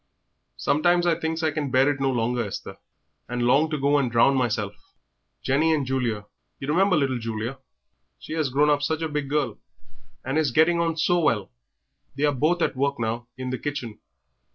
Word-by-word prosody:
"Sometimes 175 +4 +2
I 175 - +4
thinks 160 0 -3
I 155 - +2
can 145 -1 -3
bear 130 +1 +4
it 145 -2 0
no 135 0 +1
longer, 120 -1 0
Esther, 105 - -7 0.5
and 120 0 -2
long 140 +6 +3
to 155 - -2
go 140 +1 +2
and 125 -4 -1
drown 120 +4 +4
meself. 110 -5 0 0.7
Jenny 155 +4 +2
and 145 -3 -1
Julia 120 -5 -1 0.3
you 135 - -6
remember 185 +5 +3
little 135 -4 +1
Julia; 115 +3 -4 0.6
she - - -8
'as 155 -4 0
grown 145 +3 +3
up 145 0 +2
such 160 +2 -1
a - - 0
big 150 -2 -3
girl, 140 -7 -1 0.7
and 135 +4 0
is 155 -3 +2
getting 160 +7 +3
on 165 -1 0
so 175 +2 +2
well 115 - 0 0.6
they 140 - -3
are 145 -1 +3
both 160 +6 +1
at - - 0
work 140 +1 0
now 115 +1 -2
in 130 0 -4
the 130 - -3
kitchen. 130 -7 -5
140 Hz, 195 wpm, -25 LUFS, 125-155 Hz, 0.7 s, I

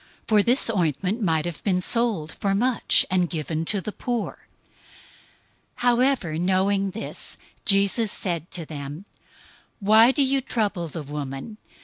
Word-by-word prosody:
026:009 - - -38
For 215 -2 +5
this 240 +3 +5
ointment 185 - -1
might 160 -5 +1
have 170 -3 -6
been 185 -3 +1
sold 205 -6 +1
for 195 +2 -1
much, 245 +4 +3
and 180 -2 +1
given 160 0 -3
to 200 +3 +1
the 215 - -5
poor." 240 0 -4 0.7
026:010 - - -25 0.6
However, 245 - +1
knowing 195 +2 +1
this, 220 +4 -7 0.3
Jesus 200 +2 +2
said 170 -3 -3
to 170 -3 -4
them, 145 +3 -8 0.7
"Why 220 +3 +6
do 280 +1 +2
you 270 0 +1
trouble 205 -8 -2
the 160 0 -7
woman? 145 - -7
195 Hz, 145 wpm, -24 LUFS, 165-225 Hz, 0.7 s, Why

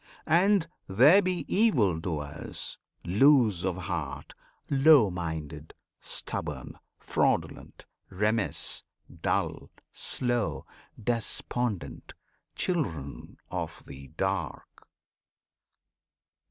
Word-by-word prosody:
And 180 +2 +4 0.2
there 135 - +6
be 185 -2 -2
evil 120 - +3
doers; 75 -5 -4 0.3
loose 110 - +4
of 95 -2 0
heart, 85 -7 -4 0.3
Low 135 -6 +6
minded, 80 -3 -5 0.2
stubborn, - - -5 0.2
fraudulent, - - -1 0.2
remiss, 105 +3 0 0.4
Dull, - - -1 0.2
slow, 120 -4 -1 0.3
despondent 115 -1 -2 0.4
children 85 - -3
of - - -4
the 70 0 -10
"dark." 95 -6 -3
105 Hz, 75 wpm, -28 LUFS, 85-135 Hz, 0.4 s, there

